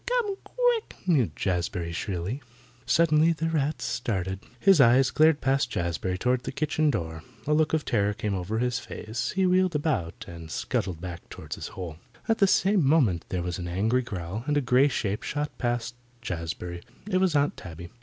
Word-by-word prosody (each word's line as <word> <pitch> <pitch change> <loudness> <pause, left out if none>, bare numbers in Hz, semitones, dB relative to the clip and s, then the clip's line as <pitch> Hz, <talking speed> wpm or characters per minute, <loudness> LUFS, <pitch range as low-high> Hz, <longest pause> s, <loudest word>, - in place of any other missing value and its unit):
Come 480 -5 +1
quick," - - 0
mewed 150 - +2
Jazbury 90 -2 -1
shrilly. 95 - -3 0.5
Suddenly 160 +2 +4
the 165 0 -2
rat 155 -1 -1
started. 95 -5 -2 0.2
His 190 -2 +6
eyes 125 +2 +5
glared 155 -1 +4
past 135 -1 +2
Jazbury 90 -1 -2
toward 125 +4 +1
the - - -5
kitchen 155 +2 +1
door. 80 - -2 0.2
A 150 - +2
look 155 0 +3
of 160 -1 0
terror 105 -2 +1
came 105 -1 -2
over 95 +4 -2
his 125 +1 0
face. 110 +3 -4
He 190 0 +3
wheeled 185 -2 +3
about 145 - -1
and 85 -2 -9
scuttled 85 +1 -2
back 85 -1 -7
toward - - -7
his - - -5
hole. 85 -5 -5 0.3
At 225 - +2
the 200 - +6
same 195 -1 +3
moment 135 - +3
there 90 -2 -2
was 90 +1 -3
an 90 - -4
angry 110 +8 +1
growl, 100 -2 -5
and 145 0 +2
a - - +5
grey 125 +2 +4
shape 105 -7 -1
shot 150 +1 -3
past 120 -1 -1 0.3
Jazbury. 85 -4 -5 0.3
It 190 -3 +1
was 185 -4 +2
Aunt 145 0 +2
Tabby. 85 -1 -9
120 Hz, 185 wpm, -27 LUFS, -, 0.5 s, His